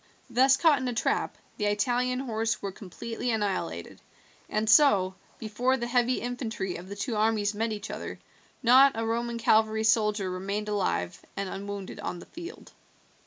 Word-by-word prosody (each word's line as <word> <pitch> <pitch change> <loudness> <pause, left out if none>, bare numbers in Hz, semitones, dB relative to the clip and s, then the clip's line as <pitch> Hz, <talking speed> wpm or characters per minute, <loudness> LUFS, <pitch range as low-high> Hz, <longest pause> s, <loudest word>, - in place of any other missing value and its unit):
Thus 265 +3 +5
caught 315 -5 +4
in 260 - -3
a 245 - -2
trap - - 0 0.2
the 210 - -1
Italian 245 +5 +1
horse 225 -3 -1
were 200 - -4
completely 230 +6 -6
annihilated, 195 - -2 0.5
and 215 +1 -1
so, 210 -7 +5 0.2
before 240 +4 0
the 240 - -3
heavy 245 +1 +1
infantry 235 -6 -3
of 180 +2 -10
the 200 - -6
two 205 +3 -3
armies 215 -1 +1
met 225 +2 -1
each 210 -1 -5
other, - - -6 0.5
not 260 +3 +7
a 225 0 -2
Roman 235 +1 -1
cavalry 220 -1 +3
soldier 210 -2 +2
remained 200 +3 -3
alive 185 - -1
and 200 0 -2
unwounded 200 0 -6
on 180 - -4
the - - -11
field. 345 +5 -10
220 Hz, 165 wpm, -28 LUFS, 205-245 Hz, 0.5 s, not